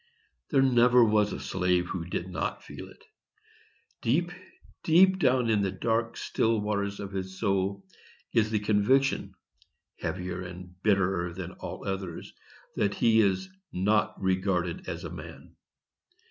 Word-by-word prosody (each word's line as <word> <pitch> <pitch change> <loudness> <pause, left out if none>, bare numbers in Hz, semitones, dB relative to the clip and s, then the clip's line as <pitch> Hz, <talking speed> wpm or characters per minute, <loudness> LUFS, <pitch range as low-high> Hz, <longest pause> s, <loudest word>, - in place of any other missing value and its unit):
There 135 -3 +4
never 125 -1 +5
was 105 -1 +2
a - - -4
slave 90 -1 0
who 85 -3 -4
did 90 +1 -3
not 90 - -3
feel - - -9
it. - - -18 1.0
Deep, 170 +9 +1 0.5
deep 185 +4 +5
down 130 -5 +3
in 110 -2 +2
the 100 - +1
dark, 115 +4 -1
still 115 -1 +1
waters 100 -1 -2
of 100 -1 -6
his 95 -1 -5
soul 100 -1 0 0.5
is 110 -2 +3
the 110 - +1
conviction, 110 +6 +2 0.6
heavier, 90 +1 -4 0.4
bitterer 95 -4 +1
than 95 -1 -6
all - - -8
others, 95 -3 -5 0.4
that 100 0 0
he 115 -1 +4
is 100 - +1 0.2
not 105 +4 +1
regarded 95 -2 -1
as - - -5
a - - -6
man. - - -10
100 Hz, 135 wpm, -28 LUFS, 95-115 Hz, 1.0 s, never